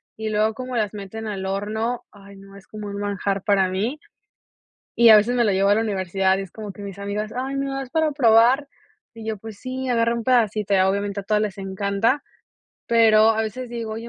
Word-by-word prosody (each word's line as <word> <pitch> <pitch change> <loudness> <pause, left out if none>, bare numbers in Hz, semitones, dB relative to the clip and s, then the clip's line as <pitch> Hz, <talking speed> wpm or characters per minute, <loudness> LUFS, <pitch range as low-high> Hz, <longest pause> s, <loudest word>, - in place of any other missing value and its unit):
y 220 0 -4
luego 215 +1 +1
como 255 +2 -5
las 215 -2 -1
meten 210 +2 -7
al 195 -2 -4
horno, 220 +5 -3
ay 200 -1 -15
no 195 0 -15
es 200 - -14
como 210 -1 -8
un 200 - -6
manjar 200 -1 -2
para 195 -3 +3
mí. 215 +11 -2 1.0
Y 235 -1 +7
a 215 - +10
veces 235 +4 +1
me 240 - +3
lo 210 - +2
llevo 195 +1 +2
a 205 - +5
la 220 - +1
universidad 190 -2 0
y 195 - -3
es 195 - -10
como 210 -1 -8
que 195 - -13
mis 200 -1 -8
amigas: 205 +2 -4
"Ay 265 +2 -3
me 275 0 -1
das 270 -1 -5
para 315 +1 +1
probar", 245 +1 +4 0.5
y 225 -1 -10
yo: 220 -1 -2
"Pues, 215 0 -10
sí 260 +2 -5
agarra 230 -1 +2
un 235 -1 -4
pedacito", 215 -5 +1
y 195 - +4
obviamente 200 +1 0
a - - -10
todas 210 +2 +1
les 205 -1 -3
encanta, 200 +7 -1 0.7
pero, 225 -1 +5
a 220 0 +1
veces 235 +3 -5
digo: 230 -2 -5
"Oye, 230 +1 -7
215 Hz, 225 wpm, -22 LUFS, 200-235 Hz, 1.0 s, a